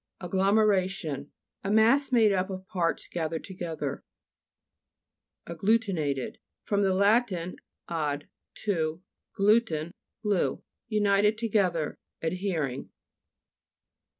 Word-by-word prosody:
AGGLOMEHA'TIOX 190 Hz, -6 st, +1 dB, 0.3 s
A 195 Hz, -, -2 dB
mass 230 Hz, +7 st, +4 dB
made 225 Hz, -4 st, +5 dB
up 190 Hz, 0 st, 0 dB
of 190 Hz, -1 st, -6 dB
parts 175 Hz, -5 st, -1 dB
gathered 160 Hz, -1 st, -3 dB
together. 165 Hz, -7 st, -5 dB, 1.4 s
AGGLUTINATED 170 Hz, -, 0 dB, 0.2 s
fr. 205 Hz, -, -1 dB
lat. 200 Hz, +4 st, +3 dB, 0.6 s
ad 150 Hz, -3 st, -2 dB, 0.3 s
to, 165 Hz, -4 st, -1 dB, 0.3 s
glu 210 Hz, +3 st, +5 dB
ten, 165 Hz, -7 st, -4 dB, 0.3 s
glue. 190 Hz, -10 st, 0 dB, 0.2 s
United 210 Hz, -1 st, +3 dB
together 195 Hz, -8 st, 0 dB, 0.2 s
5 160 Hz, -, +1 dB
ad 185 Hz, -, -3 dB
hering. 155 Hz, -10 st, -2 dB
190 Hz, 95 wpm, -28 LUFS, 160-210 Hz, 1.4 s, made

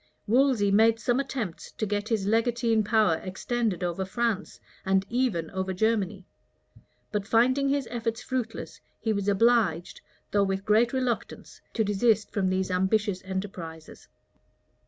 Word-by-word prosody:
Wolsey 240 Hz, -3 st, +3 dB
made 225 Hz, +2 st, +4 dB
some 245 Hz, +2 st, +1 dB
attempts 250 Hz, -10 st, -4 dB
to 215 Hz, -, -2 dB
get 205 Hz, +1 st, -2 dB
his 215 Hz, -4 st, 0 dB
legatine 230 Hz, +1 st, +2 dB
power 210 Hz, -6 st, +3 dB
extended 195 Hz, +1 st, -2 dB
over 175 Hz, +2 st, -1 dB
France, 215 Hz, +1 st, -2 dB, 0.2 s
and 190 Hz, 0 st, +2 dB
even 230 Hz, -10 st, 0 dB
over 190 Hz, -1 st, -2 dB
Germany; 205 Hz, -2 st, 0 dB, 0.9 s
but 205 Hz, -1 st, -2 dB
finding 255 Hz, +5 st, +3 dB
his 275 Hz, -3 st, 0 dB
efforts 230 Hz, -1 st, -3 dB
fruitless, 255 Hz, -3 st, -4 dB, 0.2 s
he 220 Hz, -, 0 dB
was 200 Hz, -1 st, -2 dB
obliged, 205 Hz, -5 st, +2 dB, 0.3 s
though 205 Hz, -, +3 dB
with 195 Hz, 0 st, -2 dB
great 225 Hz, +3 st, +3 dB
reluctance, 255 Hz, -3 st, -3 dB
to 225 Hz, -, +2 dB
desist 210 Hz, +1 st, +1 dB
from 190 Hz, -3 st, 0 dB
these 185 Hz, 0 st, -1 dB
ambitious 190 Hz, +1 st, +1 dB
enterprises. 185 Hz, -4 st, -7 dB
210 Hz, 135 wpm, -27 LUFS, 190-235 Hz, 0.9 s, made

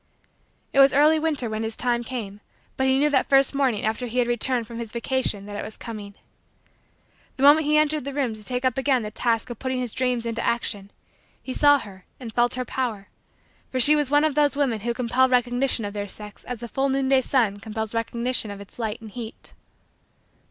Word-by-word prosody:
It 275 Hz, -, +3 dB
was 275 Hz, 0 st, +7 dB
early 305 Hz, +2 st, +5 dB
winter 305 Hz, -6 st, -1 dB
when 215 Hz, 0 st, -3 dB
his 225 Hz, 0 st, -3 dB
time 240 Hz, -1 st, 0 dB
came 215 Hz, -5 st, -6 dB, 0.3 s
but 265 Hz, -, 0 dB
he 265 Hz, 0 st, +3 dB
knew 295 Hz, +2 st, +2 dB
that 265 Hz, -2 st, +2 dB
first 275 Hz, 0 st, +4 dB
morning 265 Hz, -7 st, 0 dB
after 220 Hz, +3 st, -1 dB
he 240 Hz, +2 st, -6 dB
had 245 Hz, -1 st, +3 dB
returned 240 Hz, 0 st, 0 dB
from 230 Hz, +1 st, -8 dB
his 230 Hz, -2 st, -5 dB
vacation 235 Hz, -4 st, -1 dB
that 205 Hz, 0 st, -8 dB
it -, -, -4 dB
was 215 Hz, -, -8 dB
coming. 210 Hz, -3 st, -8 dB, 1.2 s
The 265 Hz, -, -2 dB
moment 295 Hz, +2 st, +6 dB
he 305 Hz, 0 st, +4 dB
entered 305 Hz, -1 st, +2 dB
the 280 Hz, -, -4 dB
room 270 Hz, -5 st, -1 dB
to 215 Hz, -1 st, -10 dB
take 250 Hz, +3 st, -3 dB
up 255 Hz, 0 st, +1 dB
again 265 Hz, -3 st, +1 dB
the 210 Hz, -, -5 dB
task 230 Hz, +1 st, -1 dB
of 235 Hz, -, -8 dB
putting 260 Hz, -1 st, -2 dB
his 245 Hz, -3 st, -3 dB
dreams 250 Hz, -2 st, 0 dB
into 230 Hz, 0 st, -2 dB
action, 220 Hz, -4 st, -2 dB, 0.5 s
he 260 Hz, -, -5 dB
saw 290 Hz, +1 st, +5 dB
her 195 Hz, -7 st, -11 dB
and 235 Hz, -4 st, -8 dB
felt 240 Hz, 0 st, +2 dB
her 255 Hz, 0 st, -3 dB
power 230 Hz, -6 st, -3 dB, 0.6 s
for 260 Hz, -, -2 dB
she 295 Hz, +5 st, +7 dB
was 295 Hz, -3 st, 0 dB
one 290 Hz, +1 st, +4 dB
of 310 Hz, -2 st, +2 dB
those 290 Hz, -1 st, +2 dB
women 270 Hz, -6 st, 0 dB
who 235 Hz, +3 st, -2 dB
compel 255 Hz, +2 st, +2 dB
recognition 245 Hz, -1 st, +1 dB
of 205 Hz, -, -5 dB
their 205 Hz, -1 st, -4 dB
sex 210 Hz, +1 st, -7 dB
as 245 Hz, -2 st, -6 dB
the 235 Hz, -, -5 dB
full 270 Hz, +4 st, -1 dB
noonday 270 Hz, 0 st, +2 dB
sun 230 Hz, -7 st, +1 dB
compels 220 Hz, +1 st, -4 dB
recognition 235 Hz, 0 st, -1 dB
of 200 Hz, -1 st, -7 dB
its 200 Hz, +3 st, -14 dB
light 220 Hz, -1 st, -3 dB
and 220 Hz, -2 st, -10 dB
heat. 230 Hz, 0 st, -9 dB
245 Hz, 220 wpm, -24 LUFS, 220-270 Hz, 1.2 s, was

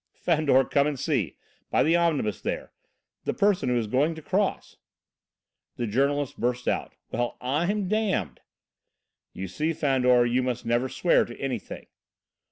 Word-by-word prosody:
"Fandor, 150 Hz, -5 st, +3 dB
come 140 Hz, +2 st, +2 dB
and 150 Hz, -2 st, -2 dB
see! 130 Hz, -, -1 dB, 0.3 s
By -, -, +3 dB
the 165 Hz, +2 st, +3 dB
omnibus, 150 Hz, -, +1 dB
there. -, -, -4 dB, 0.5 s
The -, -, -1 dB
person 200 Hz, -10 st, +2 dB
who 125 Hz, -, +2 dB
is 115 Hz, -, 0 dB
going 140 Hz, +9 st, +1 dB
to 160 Hz, -, -9 dB
cross." 195 Hz, +4 st, -1 dB, 1.0 s
The 120 Hz, -, -2 dB
journalist 140 Hz, +5 st, 0 dB
burst 125 Hz, +1 st, -1 dB
out: -, -, -1 dB, 0.2 s
"Well, 120 Hz, +1 st, -2 dB
I'm 175 Hz, +10 st, 0 dB
damned!" 195 Hz, -, -1 dB, 0.9 s
"You 95 Hz, -, -6 dB
see, 155 Hz, -, -1 dB
Fandor, 125 Hz, -5 st, +3 dB
you 120 Hz, +2 st, +1 dB
must 125 Hz, -1 st, -3 dB
never 120 Hz, +3 st, +1 dB
swear 175 Hz, -, +3 dB
to 120 Hz, -, -11 dB
anything." 130 Hz, -5 st, -5 dB
135 Hz, 150 wpm, -26 LUFS, 120-160 Hz, 1.0 s, Fandor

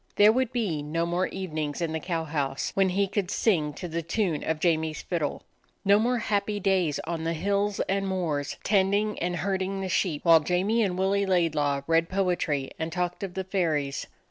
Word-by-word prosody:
There 210 Hz, +1 st, +7 dB
would 255 Hz, +1 st, 0 dB
be 205 Hz, -12 st, -1 dB
no 160 Hz, +3 st, -1 dB
more 175 Hz, +2 st, 0 dB
evenings 155 Hz, -6 st, -4 dB
in 165 Hz, -2 st, -1 dB
the 160 Hz, -, -2 dB
cow 165 Hz, -1 st, -2 dB
house 145 Hz, -3 st, -2 dB
when 195 Hz, -1 st, +3 dB
he 195 Hz, +2 st, +1 dB
could 195 Hz, -2 st, -2 dB
sing 165 Hz, -11 st, +1 dB
to 180 Hz, -, -6 dB
the 170 Hz, 0 st, -3 dB
tune 170 Hz, -2 st, -1 dB
of 160 Hz, -1 st, -1 dB
Jamie's 160 Hz, -2 st, 0 dB
fiddle, 165 Hz, -5 st, -2 dB, 0.4 s
no 200 Hz, +1 st, +6 dB
more 245 Hz, +3 st, +1 dB
happy 205 Hz, -1 st, -1 dB
days 185 Hz, -7 st, +1 dB
on 165 Hz, 0 st, -3 dB
the 165 Hz, +1 st, 0 dB
hills 200 Hz, +4 st, 0 dB
and 195 Hz, +1 st, -1 dB
moors 165 Hz, -7 st, -2 dB
tending 205 Hz, +1 st, +2 dB
and 175 Hz, +1 st, -1 dB
herd 190 Hz, +3 st, -1 dB
ing 195 Hz, +1 st, -2 dB
the 190 Hz, -, -3 dB
sheep, 170 Hz, -3 st, 0 dB
while 165 Hz, -1 st, +8 dB
Jamie 185 Hz, +8 st, +1 dB
and 185 Hz, -4 st, 0 dB
Willie 195 Hz, +1 st, +1 dB
Laidlaw 155 Hz, -6 st, +1 dB
read 165 Hz, +1 st, +2 dB
poetry 175 Hz, -8 st, 0 dB
and 160 Hz, 0 st, -2 dB
talked 175 Hz, +1 st, -2 dB
of 195 Hz, -3 st, -5 dB
the 190 Hz, -, -2 dB
fairies. 155 Hz, -8 st, -1 dB
180 Hz, 195 wpm, -27 LUFS, 160-195 Hz, 0.4 s, while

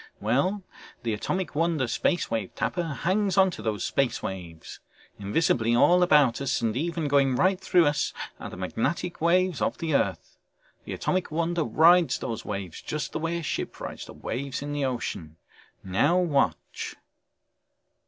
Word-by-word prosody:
Well... 140 Hz, -, 0 dB, 0.4 s
the 115 Hz, -2 st, -1 dB
Atomic 180 Hz, -, -2 dB
Wonder 160 Hz, -4 st, +1 dB
Space 175 Hz, +8 st, 0 dB
Wave 110 Hz, -5 st, -3 dB
Tapper 115 Hz, +10 st, -1 dB, 0.2 s
hangs 195 Hz, +1 st, +1 dB
onto 190 Hz, -2 st, +3 dB
those 105 Hz, -3 st, -2 dB
space 135 Hz, -3 st, 0 dB
waves. 85 Hz, -4 st, -7 dB, 0.4 s
Invisibly 115 Hz, +2 st, +1 dB
all 175 Hz, +8 st, +5 dB
about 150 Hz, -8 st, +4 dB
us, 135 Hz, -, 0 dB
and 115 Hz, -2 st, -1 dB
even 165 Hz, +2 st, -1 dB
going 140 Hz, -2 st, +3 dB
right 185 Hz, +7 st, +2 dB
through 175 Hz, -2 st, +4 dB
us, 145 Hz, 0 st, +1 dB, 0.3 s
are -, -, -6 dB
the -, -, -9 dB
magnetic 135 Hz, -, -2 dB
waves 175 Hz, -2 st, +2 dB
of -, -, 0 dB
the 160 Hz, -2 st, -2 dB
earth. -, -, -1 dB, 0.5 s
The -, -, -5 dB
Atomic 185 Hz, -1 st, -1 dB
Wonder 170 Hz, +1 st, 0 dB
rides 170 Hz, +3 st, +5 dB
these 115 Hz, -2 st, -4 dB
waves 100 Hz, -5 st, -5 dB
just 150 Hz, 0 st, -4 dB
the -, -, -3 dB
way 165 Hz, +1 st, -1 dB
a 170 Hz, -, -5 dB
ship -, -, -4 dB
rides -, -, -7 dB
the -, -, -10 dB
waves 135 Hz, +2 st, -4 dB
in 145 Hz, 0 st, -4 dB
the 145 Hz, -1 st, 0 dB
ocean. 100 Hz, -11 st, -4 dB, 0.5 s
Now 115 Hz, -, +2 dB
watch...." 145 Hz, -, 0 dB
145 Hz, 160 wpm, -26 LUFS, 115-175 Hz, 0.5 s, all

